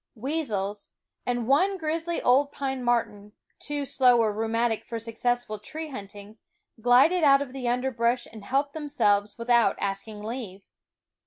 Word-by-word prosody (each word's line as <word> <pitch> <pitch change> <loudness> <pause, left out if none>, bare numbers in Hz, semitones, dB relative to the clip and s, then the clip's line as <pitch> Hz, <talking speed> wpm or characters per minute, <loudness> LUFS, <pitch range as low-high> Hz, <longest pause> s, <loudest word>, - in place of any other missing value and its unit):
Weasels, 215 -7 -3 0.4
and 245 -2 -1
one 370 +9 +3
grizzly 330 +1 -2
old 280 +3 +4
pine 265 -3 -3
marten, 210 -4 -1 0.3
too 290 -1 -3
slow 250 -2 +4
or 220 -2 +2
rheumatic 225 +1 0
for 230 - -5
successful 230 0 -2
tree 310 +9 -7
hunting, 205 -3 -10 0.4
glided 265 +9 +5
out 275 -2 +6
of 255 -2 -12
the 260 -2 -4
underbrush 245 -1 0
and 220 -2 -10
helped 275 +6 0
themselves 210 -10 0
without 235 -3 +3
asking 205 +2 -4
leave. 215 -4 -6
240 Hz, 140 wpm, -26 LUFS, 215-275 Hz, 0.4 s, out